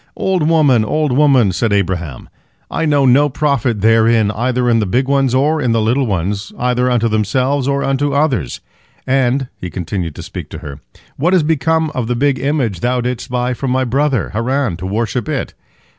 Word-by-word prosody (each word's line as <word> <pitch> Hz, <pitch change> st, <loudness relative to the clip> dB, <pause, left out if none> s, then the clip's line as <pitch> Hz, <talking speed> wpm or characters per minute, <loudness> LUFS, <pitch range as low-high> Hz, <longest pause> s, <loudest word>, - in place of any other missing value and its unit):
"Old 180 Hz, -5 st, 0 dB
woman, 145 Hz, -8 st, +4 dB
old 150 Hz, +6 st, 0 dB
woman," 130 Hz, -6 st, +4 dB
said 105 Hz, +5 st, -1 dB
Abraham, 90 Hz, -8 st, -2 dB, 0.4 s
"I -, -, -1 dB
know 145 Hz, -3 st, +2 dB
no 140 Hz, +4 st, +4 dB
profit 130 Hz, -6 st, -1 dB
therein, 115 Hz, -1 st, +3 dB
either 125 Hz, +3 st, -1 dB
in 115 Hz, -1 st, +3 dB
the 105 Hz, -, -1 dB
big 130 Hz, +8 st, 0 dB
ones 135 Hz, -2 st, +1 dB
or 150 Hz, +4 st, +1 dB
in 120 Hz, -4 st, +1 dB
the 115 Hz, -, +2 dB
little 120 Hz, +5 st, +1 dB
ones, 100 Hz, +1 st, -2 dB
either 125 Hz, 0 st, 0 dB
unto 120 Hz, -2 st, +1 dB
themselves 125 Hz, +6 st, 0 dB
or 140 Hz, 0 st, 0 dB
unto 135 Hz, +1 st, 0 dB
others. 135 Hz, -, -1 dB, 0.4 s
And," 130 Hz, 0 st, +1 dB
he 90 Hz, -, -6 dB
continued 90 Hz, -3 st, -4 dB
to -, -, -8 dB
speak -, -, -8 dB
to -, -, -8 dB
her, 70 Hz, 0 st, -8 dB, 0.4 s
"what 175 Hz, +6 st, +1 dB
has 180 Hz, -4 st, +4 dB
become 160 Hz, +1 st, +1 dB
of 125 Hz, -6 st, -3 dB
the 120 Hz, -, -1 dB
big 135 Hz, +1 st, +1 dB
image 135 Hz, -, -1 dB
thou 125 Hz, +5 st, 0 dB
didst 125 Hz, -1 st, -4 dB
buy 125 Hz, 0 st, -1 dB
from 130 Hz, +2 st, -4 dB
my 130 Hz, +1 st, +1 dB
brother 130 Hz, -1 st, 0 dB
Haran, 120 Hz, -1 st, -1 dB
to 95 Hz, -, -6 dB
worship 115 Hz, +3 st, -2 dB
it?" -, -, -3 dB
125 Hz, 190 wpm, -16 LUFS, 110-140 Hz, 0.4 s, woman